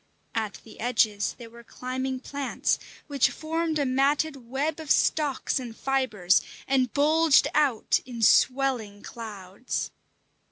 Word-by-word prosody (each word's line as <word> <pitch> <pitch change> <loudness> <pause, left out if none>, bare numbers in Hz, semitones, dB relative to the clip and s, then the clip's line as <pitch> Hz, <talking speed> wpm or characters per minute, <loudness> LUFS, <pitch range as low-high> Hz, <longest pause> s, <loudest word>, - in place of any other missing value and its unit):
At 220 -2 -2
the 225 - -15
edges 220 -4 +1
there 230 -2 -11
were 235 0 -13
climbing 255 +2 -4
plants, 280 0 -1 0.3
which 280 -4 +2
formed 320 0 -2
a 285 - +1
matted 275 0 0
web 290 +5 -1
of 315 -2 -8
stalks 290 -3 +1
and 235 -3 -8
fibres, 255 -10 +2 0.3
and 260 -3 +2
bulged 310 +1 +4
out 280 -7 +2
in 235 -3 -6
swelling 250 -5 +2
clouds. 210 -1 -5
260 Hz, 125 wpm, -26 LUFS, 230-285 Hz, 0.3 s, bulged